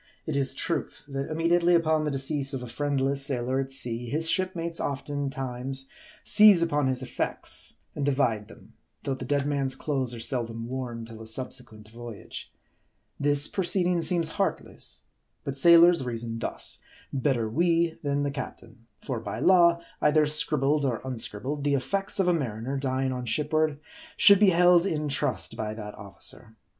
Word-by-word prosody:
It 155 - -3
is 135 -1 0
truth, 170 +4 -3
that 135 0 -4
immediately 170 +2 +3
upon 160 -2 +2
the - - 0
decease 135 0 -1
of 125 - -5
a - - -6
friendless 140 +2 -1
sailor 130 -1 -1
at 135 0 -3
sea, 120 -3 -1
his 160 +4 -1
shipmates 170 -2 -1
oftentimes 135 -2 -3 0.3
seize 210 -5 +6
upon 150 -4 +1
his 130 0 -1
effects, - - -4 0.2
and 145 - -3
divide 125 -7 +1
them; - - -16 0.3
though 135 - -1
the 130 -1 -6
dead 140 +1 0
man's 140 -2 0
clothes 130 -5 -2
are - - -8
seldom 115 -1 -3
worn 120 -3 -5
till 115 -1 -10
a 110 - -9
subsequent 110 -2 -5
voyage. 115 -1 -9 0.7
This 145 0 +3
proceeding 180 -2 +2
seems 165 0 +2
heartless. - - -4 0.4
But 140 - -4
sailors 170 +1 +6
reason 115 -2 -4
thus: - - -5 0.3
Better 130 -4 +1
we, 165 +6 +1
than 145 -1 0
the 145 - -1
captain. 115 -3 -8 0.2
For 125 -4 -3
by 115 - -5
law, 170 -2 +5 0.2
either 150 0 +4
scribbled 150 -1 +1
or 125 -5 0
unscribbled, 130 +3 -3
the 145 -1 +2
effects 195 +9 -2
of 190 - +2
a 180 - +4
mariner, 130 -4 -3
dying 135 -1 -1
on 125 -1 -4
shipboard, 155 +4 +1 0.4
should 200 -2 +7
be 210 -2 +6
held 175 +1 +5
in 150 -4 -2
trust 130 - -1
by 110 0 -4
that 105 -1 -7
officer. 100 +2 -9
140 Hz, 160 wpm, -27 LUFS, 125-155 Hz, 0.7 s, should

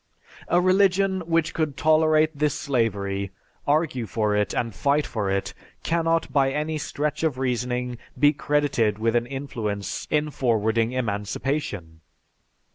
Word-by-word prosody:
A 175 - +3
religion 190 +1 +3
which 165 -1 +1
could 155 -4 -1
tolerate 155 0 +3
this 150 0 +1
slavery, 100 -7 -1 0.4
argue 145 -6 +1
for 105 -2 0
it, 105 0 +1
and 115 -2 -2
fight 145 +8 +1
for 105 -4 -2
it, 100 0 -1 0.3
cannot 165 -3 0
by 135 -1 +3
any 150 +2 -2
stretch 150 0 -2
of 155 -5 0
reasoning 125 -1 -2 0.2
be 145 0 +5
credited 140 -8 +1
with 115 +1 0
an 120 0 +1
influence 115 -7 -4
in 150 0 +1
forwarding 115 -2 +1
emancipation. 105 - -3
135 Hz, 130 wpm, -24 LUFS, 110-155 Hz, 0.4 s, be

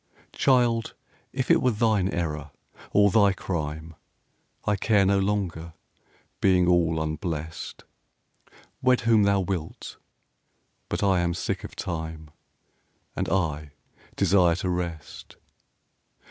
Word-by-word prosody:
Child, 120 -4 +2 0.4
if 130 -1 -1
it - - +5
were 130 - +3
thine 105 -4 +1
error 75 -5 -3 0.4
or 100 -1 +4
thy 100 -1 +4
crime 80 -3 -4 0.7
I 105 - +2
care 100 0 +2
no 100 +1 +3
longer, 95 -5 -2 0.7
being 90 -2 +3
all 85 -2 +2
unblest: 80 0 -5 1.0
Wed 130 -1 +3
whom 115 -2 +4
thou 100 -1 +3
wilt, 90 -4 -5 0.9
but - - -2
I 95 -2 +3
am 85 -1 0
sick - - -3
of - - -9
Time, 80 -3 -5 0.8
And - - -2
I 75 -5 -1 0.4
desire 90 -4 +3
to 90 +1 -3
rest. 85 -3 -5
90 Hz, 115 wpm, -26 LUFS, 80-100 Hz, 1.0 s, it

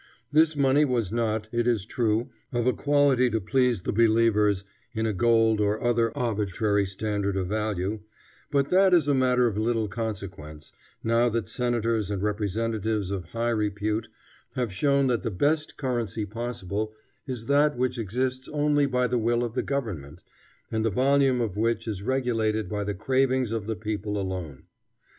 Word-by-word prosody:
This 155 +1 +4
money 140 +1 +4
was 120 -8 0
not, 110 -2 -1
it 120 0 0
is 115 -6 +1
true, 115 0 0 0.2
of 120 -2 -1
a 125 - +3
quality 140 -3 +3
to 110 -1 0
please 120 -1 +1
the - - -2
believers 110 -3 +3 0.3
in 110 0 0
a 110 - 0
gold 115 +1 +3
or 105 +1 +1
other 115 -1 +2
arbitrary 105 -3 0
standard 100 0 -2
of 90 -1 -2
value, 105 -1 -2 0.5
but 140 -1 +1
that 190 0 +5
is 165 -4 +3
a 145 - +3
matter 125 -2 +3
of 105 -3 0
little 110 -1 0
consequence, 95 -8 -6 0.3
now 115 +2 +3
that 115 -1 -2
senators 115 -4 -1
and 100 -1 -2
representatives 105 0 -1
of 95 -3 -3
high 115 +7 -2
repute 105 0 -1 0.5
have 120 -6 -2
shown 140 +5 +2
that 120 -5 +1
the 115 - -2
best 150 - 0
currency 120 -6 -2
possible 110 -1 -4 0.3
is 125 -4 -5
that 145 +1 +3
which 125 0 -1
exists 125 +5 -2
only 145 -1 +2
by 125 -2 +1
the 125 0 0
will 120 +1 +1
of 120 -2 -3
the 130 - 0
government, 90 - -4 0.5
and 110 -1 0
the 115 - +2
volume 135 +3 +3
of 110 -5 -2
which 115 +1 0
is 105 -4 -3
regulated 110 -4 0
by 105 +1 -3
the 100 0 -3
cravings 130 +2 +1
of 110 -2 -3
the 110 - -1
people 105 -1 -3
alone. 90 -8 -5
115 Hz, 170 wpm, -26 LUFS, 105-125 Hz, 0.5 s, that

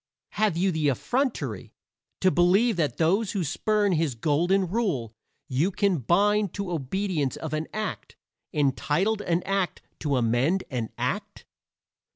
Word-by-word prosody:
Have 210 -6 +1
you 190 +2 +2
the 160 -3 0
effrontery 250 - -2 0.5
to 185 - +4
believe 195 +7 +4
that 145 -8 0
those 190 +6 +2
who 195 -4 0
spurn 205 +6 +1
his 160 -6 0
Golden 170 - +2
Rule 175 - -1 0.3
you 145 +6 +1
can 200 -3 +1
bind 205 - +2
to 200 -3 -3
obedience 165 -1 -1
of 160 -1 -6
an 155 +1 -2
act 215 0 -5 0.4
entitled 150 - +1
an 175 -2 0
act 195 -2 -1 0.2
to 145 -3 0
amend 125 +11 +1
an 120 -4 -2
act? - - -3
175 Hz, 140 wpm, -26 LUFS, 145-200 Hz, 0.5 s, to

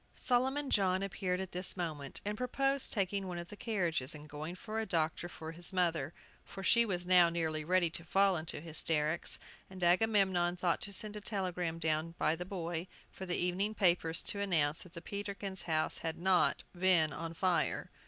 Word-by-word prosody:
Solomon 265 +3 0
John 190 -1 +2
appeared 185 -2 -2
at 190 -1 -5
this 180 +2 0
moment, 155 -6 -3
and 210 +1 -1
proposed 270 +3 +1
taking 195 -2 -1
one 180 -1 -4
of 175 0 -7
the - - -8
carriages, 175 - -1
and 150 0 -10
going 150 +4 -6
for 215 +3 -5
a 220 - -1
doctor 165 0 0
for 160 -2 -8
his 175 +3 0
mother, 170 -6 0 0.3
for 195 - -9
she 235 +4 +4
was 180 -3 -2
now 180 -2 +6
nearly 160 -2 -1
ready 175 0 +2
to 170 +1 -5
fall 195 +3 +3
into 160 -2 -2
hysterics, 160 0 0 0.3
and 185 -1 -7
Agamemnon 185 -2 +3
thought 175 -1 0
to 200 - -3
send 210 +2 +2
a 210 - -6
telegram 180 -5 -2
down 160 0 -1
by 160 - +2
the 180 +2 -6
boy, 175 -2 -4 0.2
for 190 - -8
the 175 - 0
evening 190 +5 0
papers, 170 -4 +2
to 200 - 0
announce 165 -7 +1
that 180 - -13
the 170 - -9
Peterkins' 200 -2 -4
house 155 -1 0
had 165 0 -3
not 185 +1 +2
been 175 -4 +3
on 165 0 -5
fire. 180 0 0
180 Hz, 190 wpm, -33 LUFS, 165-195 Hz, 0.3 s, now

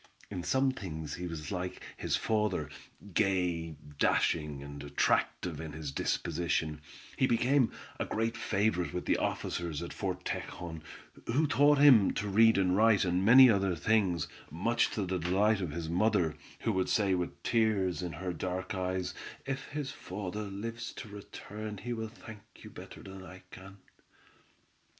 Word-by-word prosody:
In 95 -3 -3
some 130 +8 +2
things 80 -10 -6
he 90 0 -4
was 75 -3 -6
like 90 -1 -3 0.2
his - - -1
father; 105 -8 0 0.4
gay, 90 -5 +1 0.2
dashing, 75 -4 +1
and 70 0 -8
attractive 75 +3 0
in 80 -2 -7
his 75 -2 -5
disposition, 80 0 -1 0.4
he 130 - +3
became 125 +1 +3 0.3
a - - 0
great 115 +1 -1
favorite 100 -5 0
with 90 - -3
the - - +2
officers 85 -4 -2
at - - -6
Fort - - -4
Tejon, 80 -2 -5 0.5
who 140 +7 +2
taught 145 +2 +4
him 135 -8 +7
to 105 - -2
read 110 +2 +5
and 95 -1 +3
write 110 -2 +4
and 90 +1 +1
many 125 +5 +9
other 100 -5 +2
things, 95 -3 +1 0.2
much 115 +10 +1
to 105 - -2
the 90 0 -1
delight 100 +5 +2
of 90 - -2
his 80 +2 -4
mother, 90 -2 +2 0.3
who 115 - +1
would 95 -2 0
say 100 -3 +2
with 90 -1 -3
tears 105 -6 +1
in 90 -2 -4
her 90 +3 -4
dark 95 +2 -3
eyes: 95 -1 -2 0.3
"If 135 0 -4
his 145 -2 -4
father 100 +2 -5
lives 115 +4 -5
to 110 - -8
return 105 +1 -8
he 120 +5 -4
will 110 -1 -4
thank 110 -1 -11 0.2
you - - -10
better - - -11
than 95 -1 -9
I 95 0 -12
can." 95 +1 -11
95 Hz, 160 wpm, -31 LUFS, 85-110 Hz, 0.5 s, many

